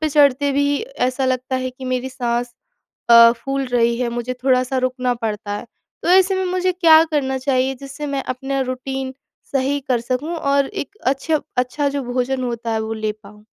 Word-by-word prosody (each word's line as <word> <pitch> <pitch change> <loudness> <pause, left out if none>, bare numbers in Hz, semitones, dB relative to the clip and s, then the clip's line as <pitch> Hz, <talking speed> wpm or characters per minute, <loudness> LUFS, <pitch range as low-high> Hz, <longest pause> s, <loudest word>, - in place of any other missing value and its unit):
पे 310 - +1
चढ़ते 285 -1 +3
भी 285 +1 +1
ऐसा 265 - -2
लगता 255 0 -1
है 255 0 -2
कि 260 +1 -11
मेरी 255 0 -2
साँस 240 -1 -2 0.6
अ, 235 0 +9
फूल 270 +3 -3
रही 235 -1 +2
है, 240 - 0
मुझे 240 +1 -3
थोड़ा-सा 255 0 +2
रुकना 255 -1 0
पड़ता 215 -2 -4
है, - - -8 0.4
तो - - 0
ऐसे 380 +1 +5
में 375 0 -1
मुझे 370 0 +1
क्या 325 -3 +6
करना 265 -3 0
चाहिए 260 0 +1
जिससे 275 +2 -7
मैं 275 -1 -1
अपना 270 +2 -3
रूटीन 260 +1 -4 0.4
सही 275 +1 +1
कर 245 -2 +3
सकूँ? 255 +7 -2
और 280 -3 +1
एक 395 - -6
अच्छे 280 +4 +1 0.2
अच्छा 265 +3 0
जो 280 0 -2
भोजन 255 +1 -1
होता 235 -1 -3
है 220 - 0
वो 220 0 -3
ले 215 -1 -2
पाऊँ? 210 +1 -15
260 Hz, 190 wpm, -20 LUFS, 245-280 Hz, 0.6 s, अ